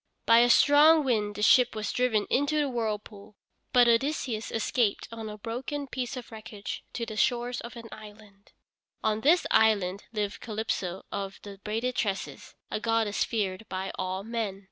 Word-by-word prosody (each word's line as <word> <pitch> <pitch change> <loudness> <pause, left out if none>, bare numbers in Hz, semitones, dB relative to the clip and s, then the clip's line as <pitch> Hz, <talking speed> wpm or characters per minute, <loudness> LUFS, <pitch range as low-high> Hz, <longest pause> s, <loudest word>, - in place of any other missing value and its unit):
By 230 0 +7
a 240 +1 +5
strong 300 +5 +6
wind 210 -6 0
the 210 - -3
ship 250 +1 +5
was 215 -1 -2
driven 240 -4 +1
into 285 +3 +2
this 300 -1 +2
whirlpool, 215 -4 -4 0.4
but 245 -1 +6
Odysseus 235 -2 0
escaped 225 -1 0
on 225 -1 -6
a 210 - -8
broken 250 +7 -4
piece 255 -1 -4
of 245 -2 -9
wreckage 215 -2 -7
to 235 - -3
the 220 -1 -7
shores 245 +2 0
of 235 +1 -9
an 230 -1 -9
island. 210 -2 -14 0.5
On 215 0 0
this 330 +7 +4
island 200 -3 +3
lived 210 -3 -3
Calypso 210 -5 -3
of 195 -1 -5
the 200 -1 -10
braided 225 +4 -2
tresses, 200 -5 -3 0.2
a - - -1
goddess 225 -2 +1
feared 205 -2 -3
by 190 +1 -3
all 185 +1 -3
men. 220 -3 -3
220 Hz, 165 wpm, -28 LUFS, 205-245 Hz, 0.5 s, By